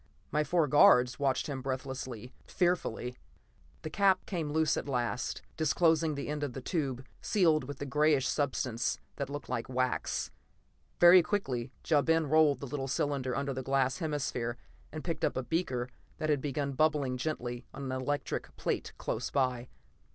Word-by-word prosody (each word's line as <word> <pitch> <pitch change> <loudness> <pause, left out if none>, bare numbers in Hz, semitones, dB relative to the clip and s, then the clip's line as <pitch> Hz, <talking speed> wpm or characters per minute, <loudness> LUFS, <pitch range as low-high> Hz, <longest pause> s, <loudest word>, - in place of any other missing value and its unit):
My 150 - +2
four 165 -1 +2
guards 125 -3 +6
watched 135 -2 +1
him 135 -3 -4
breathlessly, 130 -2 -5
fearfully. 165 -9 -1 0.7
The - - -5
cap 195 -2 +3
came 165 -6 -3
loose 160 -1 +2
at - - -4
last, 125 -1 -2
disclosing 160 0 +2
the 140 - -4
end 150 0 -3
of 145 -4 -2
the 135 - -5
tube, 135 -3 -2 0.2
sealed 160 - +3
with 140 0 -7
a - - -4
grayish 150 0 +3
substance 125 -5 -1 0.2
that 140 -2 -3
looked 145 -2 -6
like 115 - -3
wax. 130 0 -1 0.7
Very 175 +1 +9
quickly 135 - -2 0.2
Ja 150 -3 +4
Ben 160 +1 +2
rolled 150 -1 +4
the - - -4
little 135 0 -3
cylinder 135 -2 -1
under 140 +1 -1
the 130 - -3
glass 135 +1 +1
hemisphere, 135 -7 -2 0.3
and - - -6
picked - - -3
up - - +1
a 130 - -1
beaker 130 -5 -1 0.3
that 155 0 0
had 145 -3 +1
been 140 0 -2
bubbling 145 -2 +1
gently 125 -3 -4
on 140 - -8
an 130 - -3
electric 145 +2 -3
plate - - -2
close - - -3
by. 125 -3 0
140 Hz, 165 wpm, -31 LUFS, 130-155 Hz, 0.7 s, Very